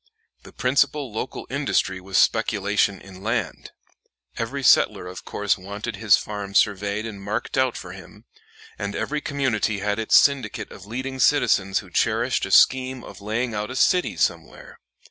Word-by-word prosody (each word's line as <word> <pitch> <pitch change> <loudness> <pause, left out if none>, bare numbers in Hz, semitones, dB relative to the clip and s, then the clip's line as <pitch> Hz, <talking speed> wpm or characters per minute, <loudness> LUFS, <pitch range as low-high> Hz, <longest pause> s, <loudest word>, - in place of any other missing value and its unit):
The - - -14
principal 140 +1 0
local 110 - -5
industry 95 0 0
was 95 -1 -2
speculation 100 +4 +2
in 95 -1 -13
land. - - -3 0.7
Every - - -4
settler - - +4
of 90 0 -9
course 105 -1 -1
wanted 100 +3 -6
his 105 -3 +5
farm 100 -2 -6
surveyed 100 +1 +1
and 105 -3 -7
marked 105 +3 -3
out 130 -2 +1
for 90 - -8
him, 95 -1 -13 0.5
and 100 0 -4
every 150 0 -2
community 130 -8 -1
had 105 +2 -2
its 110 - +2
syndicate 135 -7 +1
of 100 - -12
leading 130 +4 -5
citizens 115 -8 +3
who - - -17
cherished - - 0
a - - -9
scheme 130 -1 +4
of - - -12
laying 115 +3 -2
out 105 +1 -3
a 130 - -6
city 180 +6 +2
somewhere. - - -3
105 Hz, 160 wpm, -23 LUFS, 100-130 Hz, 0.7 s, his